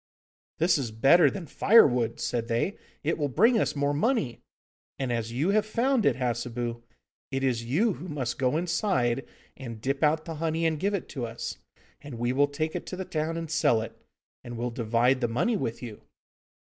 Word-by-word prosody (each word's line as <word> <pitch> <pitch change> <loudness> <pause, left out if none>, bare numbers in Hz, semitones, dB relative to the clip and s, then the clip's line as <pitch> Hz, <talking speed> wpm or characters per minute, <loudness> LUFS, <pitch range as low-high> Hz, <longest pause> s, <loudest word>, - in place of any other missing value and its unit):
'This 170 -1 +3
is 125 -4 -2
better 135 +11 +5
than 190 -4 -6
firewood,' 125 - +4
said 115 -1 -2
they; 120 - 0 0.3
'it 160 +2 -1
will 145 - +1
bring 225 - +4
us - - 0
more 145 0 +1
money. 150 - 0 0.6
And 130 -3 -2
as 115 -1 -2
you 140 +10 0
have 210 +1 +3
found 235 +2 +1
it, 135 - +3
Hassebu, 120 -1 -3 0.5
it 135 0 -2
is 120 -3 0
you 190 - +2
who 180 - -9
must 130 -5 -3
go 130 +2 +1
inside 165 - 0 0.3
and 115 -5 -8
dip 135 +4 -2
out 155 +1 +2
the 165 -2 -6
honey 165 0 0
and 160 -2 +1
give 200 0 -1
to 130 -5 -4
us, 115 - -6 0.4
and 140 -5 -8
we 120 +2 0
will 145 +2 +3
take 155 +2 -3
it - - -5
to - - -5
the 190 0 -5
town 160 +1 -2
and 165 -2 -5
sell 155 -7 +3
it, 110 - -6 0.5
and 120 -1 -7
will 120 +1 -2
divide 120 +2 +1
the 120 - +2
money 135 - 0
with 115 - -3
you. 110 -4 -8
140 Hz, 195 wpm, -27 LUFS, 120-165 Hz, 0.6 s, better